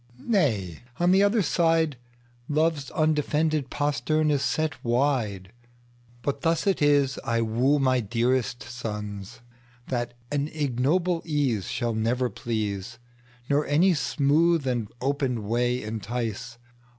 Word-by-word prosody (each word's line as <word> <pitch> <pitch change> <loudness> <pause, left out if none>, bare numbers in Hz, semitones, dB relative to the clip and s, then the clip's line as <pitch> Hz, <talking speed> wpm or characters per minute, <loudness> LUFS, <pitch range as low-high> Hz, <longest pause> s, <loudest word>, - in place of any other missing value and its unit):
Nay, 120 - 0 0.2
on 175 +1 +4
the 190 +1 +5
other 205 +1 +3
sideLove's 145 -2 -1
undefended 155 -2 +1
postern 150 +2 0
is 140 -2 +1
set 155 +2 -1
wide:But 120 +1 -3
thus 165 0 +1
it 195 -5 +1
is 145 -2 +3
I 115 0 0
wooMy 130 0 +2
dearest 120 +1 0
sons, 105 -3 -6 0.5
that 120 -2 -2 0.2
an 145 0 0
ignoble 155 +5 0
easeShall 120 - -1
never 120 +2 0
please, 110 0 -3 0.5
Nor 145 +1 +1
any 170 +6 +4
smooth 155 +1 +2
and 120 -5 -1
open 130 -5 -1
way 120 +2 0
entice. 115 +2 -4
130 Hz, 105 wpm, -26 LUFS, 120-150 Hz, 0.5 s, the